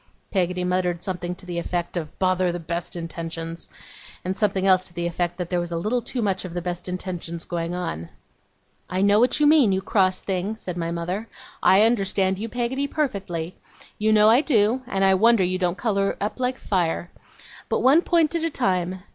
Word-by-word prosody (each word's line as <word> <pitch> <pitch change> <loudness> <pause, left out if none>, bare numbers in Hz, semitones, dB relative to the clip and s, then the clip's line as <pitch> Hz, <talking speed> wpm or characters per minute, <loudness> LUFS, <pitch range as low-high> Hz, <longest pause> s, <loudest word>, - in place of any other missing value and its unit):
Peggotty 180 -2 0
muttered 180 -1 0
something 180 -2 -3
to 185 - -14
the 175 -1 -3
effect 175 0 -3
of 160 -3 -5
'Bother 185 -1 +2
the 175 - -4
best 170 +1 -4
intentions!' 165 0 -5 0.6
and 185 +1 -1
something 195 -2 0
else 185 -1 +5
to 175 - -8
the 170 0 -2
effect 175 0 -2
that 180 -1 -5
there 180 - +1
was 175 0 -4
a 170 - -1
little 215 +8 0
too 240 0 -3
much 195 -2 0
of 180 -2 -7
the - - 0
best 180 0 -4
intentions 175 -2 -4
going 170 0 -3
on. 85 - -4 0.8
'I 185 +1 0
know 205 +1 +5
what 245 +4 +3
you 300 - +4
mean, 295 -8 +6
you 190 - +1
cross 190 -1 +1
thing,' 190 +3 -2
said 185 -5 -6
my 165 -1 -2
mother. 175 +6 -3 0.3
'I 195 +3 +6
understand 195 -4 +1
you, 225 +2 -4
Peggotty, 250 +4 -1
perfectly. 195 - -3 0.5
You 215 +1 +2
know 215 0 +6
I 235 +5 +6
do, 235 -4 +2
and 195 -6 +1
I 190 - +5
wonder 225 +1 +5
you 185 +1 0
don't 180 0 0
colour 200 -2 0
up 210 +4 -3
like 255 0 0
fire. 175 -2 -1 0.6
But - - +1
one 280 +6 +6
point 335 -3 +2
at 335 -1 -1
a 330 - +1
time. 185 - -1
185 Hz, 205 wpm, -24 LUFS, 175-215 Hz, 0.8 s, mean